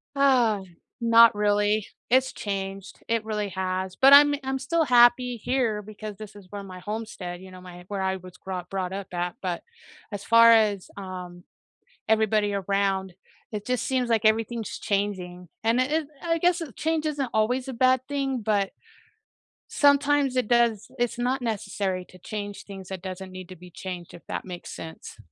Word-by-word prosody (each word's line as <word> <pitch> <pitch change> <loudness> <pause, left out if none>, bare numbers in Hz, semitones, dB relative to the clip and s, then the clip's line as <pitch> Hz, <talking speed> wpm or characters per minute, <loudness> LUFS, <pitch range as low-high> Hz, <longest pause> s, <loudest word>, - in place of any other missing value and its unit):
Ah, 250 -7 +3 0.4
not 230 0 +7
really, 205 0 +2 0.2
it's 260 0 +4
changed, 195 -1 -5
it 230 -1 0
really 210 -2 -2
has, 185 0 -3
but 270 +1 +7
I'm 290 0 +8
I'm 265 0 -2
still 320 +4 +1
happy 245 0 +5
here 225 -3 0
because 210 0 -8
this 215 -1 -10
is 200 -2 -13
where 205 - -5
my 185 -2 -9
homestead 205 -4 -6
you 190 - -11
know, 185 0 -12
my 180 -1 -11
where 200 -2 -3
I 190 0 0
was 185 0 -13
grot 180 -2 -6
brought 190 -1 -3
up 195 -1 -5
at, 175 0 -2
but 180 -2 -3 0.5
as 205 -1 -5
far 230 0 +7
as, 210 -4 +3
um, 180 -2 -8 0.7
everybody 215 -1 +2
around, 195 -1 0 0.4
it 210 -1 -4
just 250 -1 -1
seems 255 -3 0
like 225 -1 +2
everything's 225 +1 +1
changing, 185 -3 -2 0.2
and 230 +3 +2
it 255 - +2
it 310 -2 0
I 330 -1 0
guess 350 +1 +2
change 320 0 -1
isn't 285 -5 -1
always 245 +4 +1
a 265 - -4
bad 255 +1 +3
thing, 270 -3 -1
but 205 -2 +1 1.0
sometimes 285 -2 +3
it 250 -4 +1
does 235 -3 +2
it's 240 0 -1
not 255 +2 0
necessary 200 -4 -2
to 185 - -15
change 205 +2 -6
things 195 -2 -10
that 190 -2 -6
doesn't 185 0 -6
need 185 -1 -9
to 185 - -9
be 180 +1 -13
changed, 180 -1 -7
if 170 - -14
that - - -4
makes 180 -2 -8
sense. 160 0 -9
210 Hz, 175 wpm, -26 LUFS, 190-245 Hz, 1.0 s, I'm